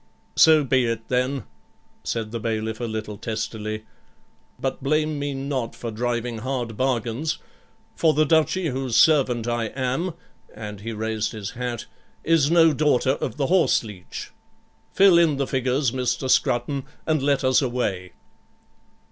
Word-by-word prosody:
'So 155 -2 +6
be 130 -2 +2
it 115 -1 -3
then,' 125 0 0 0.6
said 110 -2 -3
the 115 - -3
bailiff 110 -1 -2
a 120 - -2
little 110 -2 -5
testily, 110 -1 -4 0.7
'but 135 0 -3
blame 155 +2 0
me 145 -1 -2
not 135 -3 -3
for 115 - -5
driving 120 0 -2
hard 120 -2 -3
bargains; 130 +4 -1 0.6
for 160 - +3
the 155 0 +3
Duchy, 160 +3 +2
whose 130 -3 -2
servant 130 -7 +4
I 120 -1 0
am,' 130 +9 -2 0.4
and 105 -2 -7
he 115 +2 -5
raised 110 0 -2
his 100 -3 -5
hat, 120 -2 -4 0.4
'is 155 -3 +3
no 165 -2 +5
daughter 140 -3 +2
of 140 - -3
the 140 - +1
horse 180 -3 +3
leech. 105 -5 -8 0.6
Fill 190 -3 +6
in 160 -4 +3
the 140 - 0
figures, 130 0 0
Mr. 130 +1 -1
Scrutton, 130 +2 +1 0.2
and 155 -3 +1
let 140 0 +1
us 130 +1 +4
away.' 105 -9 -2
125 Hz, 150 wpm, -24 LUFS, 115-145 Hz, 0.7 s, So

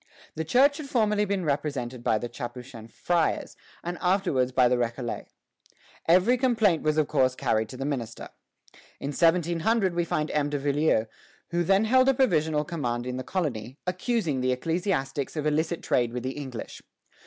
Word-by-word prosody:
" - - -24
The 160 - -2
Church 270 - +4
had 290 -3 -7
formerly 210 -4 +2
been 195 -3 -1
represented 135 -4 -2
by 110 - +2
the 120 - -4
Capuchin 120 -2 -8
friars, 170 +7 -1 0.3
and 175 +1 -4
afterwards 180 -9 +1
by 125 -1 +4
the 125 - +2
Récollets. 120 0 -3 0.8
Every 185 +9 +4
complaint 220 - +3
was 155 0 0
of 155 -2 +2
course 130 -3 +2
carried 110 -3 0
to 130 - -8
the 135 - -4
minister. 120 -6 -4 0.7
In 140 - -4
1700 175 +6 +2
we 175 0 +1
find 155 -2 -2
M. 145 -1 0
de 145 - -1
Villieu, 145 -4 +1 0.5
who 175 0 +1
then 195 +5 +3
held 255 +3 +4
a 270 - +3
provisional 160 - +2
command 125 -8 -3
in 125 0 -3
the 130 - -4
colony, 135 - -3
accusing 180 - -1
the 130 0 +1
ecclesiastics 140 -1 -1
of 155 -1 -2
illicit 160 +3 0
trade 120 -2 +1
with 125 - -4
the 130 - -2
English. 130 -5 -7
150 Hz, 175 wpm, -27 LUFS, 130-180 Hz, 0.8 s, Church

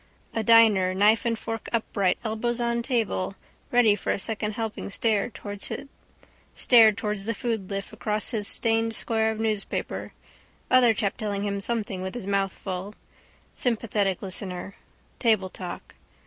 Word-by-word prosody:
A 225 - 0
diner, 215 -5 +5
knife 210 +5 +4
and 230 -1 0
fork 225 0 -5
upright, 200 -5 0
elbows 230 +2 -1
on 235 0 0
table, 225 -6 -1 0.3
ready 240 -3 +5
for 205 - -4
a - - 0
second 215 +1 -3
helping 225 -2 -4
stared 220 +2 0
towards 205 -1 -5
the - - -5 1.5
foodlift 200 -4 -3
across 210 -1 0
his 210 -4 -1
stained 225 0 +1
square 220 0 +1
of 220 - -6
newspaper. 215 -2 -2 0.6
Other 245 -3 +6
chap 200 -2 -1
telling 205 -2 -2
him 200 -1 -2
something 205 -4 -2
with 190 +3 -5
his 245 - -5
mouth 195 -1 +1
full. 190 +2 -6 0.6
Sympathetic 210 -6 0
listener. 190 0 -3 0.5
Table 215 -6 +2
talk. 180 -2 -8
215 Hz, 135 wpm, -26 LUFS, 200-230 Hz, 1.5 s, Other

